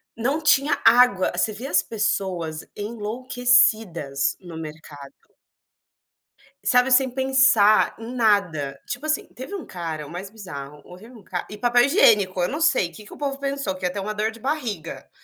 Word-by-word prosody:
não 270 +7 -1
tinha 295 -1 +3
água 235 -6 +5
você 215 +5 +1
vê 235 +6 -7
as 185 -5 +3
pessoas 180 -7 -3
enlouquecidas 215 - +1
no 175 -4 -10
mercado. 150 -3 -10 1.5
Sabe, 250 +1 +3
sem 260 +1 +5
pensar 260 -5 +4
em 230 +2 -8
nada, 180 - +1
tipo 305 - -5
assim, 310 0 -1
teve 260 +11 -8
um 375 - -7
cara 165 -4 -6
o - - -12
mais 185 +3 -7
bizarro, 150 -9 -9
houve 185 +5 -13
um 230 -6 -15
ca 175 -2 -5
e 210 - -9
papel 240 +2 +3
higiênico, 205 - +3
eu 175 - +1
não 300 +4 -4
sei, 265 - +2
que 210 - -13
que - - -13
o - - -12
povo 275 -1 -3
pensou, 275 -8 -3
que 185 -1 -6
ia 180 - -1
ter 200 - -4
uma 210 +2 -4
dor 215 +1 -1
de 230 - -14
barriga. 235 - -4
215 Hz, 175 wpm, -23 LUFS, 175-255 Hz, 1.5 s, água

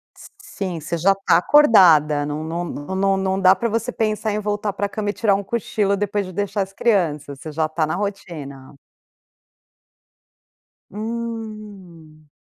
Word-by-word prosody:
S - - -14
s - - -24
sim, 195 - -5
você 160 +3 -4
já 195 +4 +3
tá 195 -4 +3
acordada, 175 - +5
não 150 +1 -4
não 165 +2 -3
não 145 -4 -6
não 190 - -4
não 195 0 +2
não 190 0 -1
dá 185 0 +6
pra 235 +5 -2
você 230 +3 -2
pensar 215 -1 -1
em 210 - -1
voltar 210 0 -2
para 205 - -2
a - - -4
cama 205 0 -3
e - - -1
tirar 210 -3 +2
um 200 - -3
cochilo 200 -1 -1
depois 205 0 -1
de 185 - -8
deixar 205 +2 -2
as 195 0 -4
crianças, 160 - 0
você 155 - -8
já 155 +1 0
tá 155 0 -1
na 160 - -2
rotina. 160 -9 -6 2.2
Hum. 210 -8 -7
195 Hz, 180 wpm, -21 LUFS, 160-210 Hz, 2.2 s, dá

